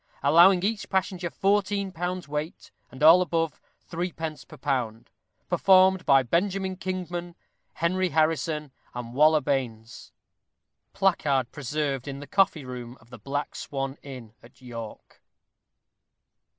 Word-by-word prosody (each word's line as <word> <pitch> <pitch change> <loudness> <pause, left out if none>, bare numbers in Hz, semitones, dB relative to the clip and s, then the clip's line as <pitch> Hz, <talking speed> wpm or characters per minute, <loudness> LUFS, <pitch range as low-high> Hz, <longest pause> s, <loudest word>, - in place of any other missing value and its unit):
Allowing 175 +6 +6
each 215 +1 -2
passenger 185 -2 -1
fourteen 200 +1 0
pounds' 180 0 -4
weight, 150 +3 -5 0.2
and 130 +4 -7
all 165 +4 +8
above, 165 -3 -1 0.2
three 175 +1 -4
pence 160 -1 -6
per - - -14
pound. 120 -5 -3 0.4
Performed 190 -1 +4
by 135 -1 +6
Benjamin 190 - -1
Kingman, 175 -2 -5 0.4
Henry 185 +2 0
Harrison, 155 -1 0 0.2
and 120 -1 -6
Waller 155 +3 +5
Baynes. 120 -5 -4 0.8
_Placard, 145 -10 +1
preserved 145 -1 -3
in 140 0 -5
the 145 - -8
coffee 170 -5 +1
room, 125 -1 -8
of 115 +2 -23
the 125 - -10
Black 145 +1 -4
Swan 135 -1 -5
Inn 125 -6 -10
at 120 +2 -19
York. 115 -4 -10
155 Hz, 125 wpm, -26 LUFS, 135-180 Hz, 0.8 s, all